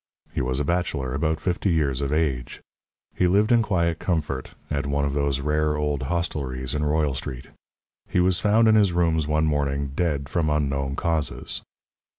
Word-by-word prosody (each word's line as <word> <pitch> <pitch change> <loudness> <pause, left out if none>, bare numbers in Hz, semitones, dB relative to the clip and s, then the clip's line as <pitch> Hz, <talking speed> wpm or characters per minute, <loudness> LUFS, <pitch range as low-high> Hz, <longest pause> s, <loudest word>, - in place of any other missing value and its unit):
He 80 - -1
was 65 +1 -1
a 75 - 0
bachelor, 80 -6 -1
about 80 +3 0
fifty 90 +4 -1
years 70 -5 +1
of 70 0 -2
age. 75 -6 -1 0.5
He 90 - +2
lived 105 +5 +3
in 120 -1 +6
quiet 85 -6 0
comfort, 75 -7 -2 0.2
at 70 -1 -1
one 70 0 0
of 70 - -1
those 70 -1 0
rare 75 +1 +1
old 75 -2 -1
hostelries 65 -5 -2
in 75 0 -1
Royal 75 -1 +1
Street. 65 -1 -6 0.6
He - - +1
was 90 0 +3
found 110 +2 +4
in 110 - +6
his 100 -4 +4
rooms, 80 -3 +1
one 75 +1 +2
morning, 70 -2 0
dead 75 -6 0
from 80 0 0
unknown 70 -2 0
causes. 80 -2 -2
75 Hz, 175 wpm, -24 LUFS, 70-85 Hz, 0.6 s, in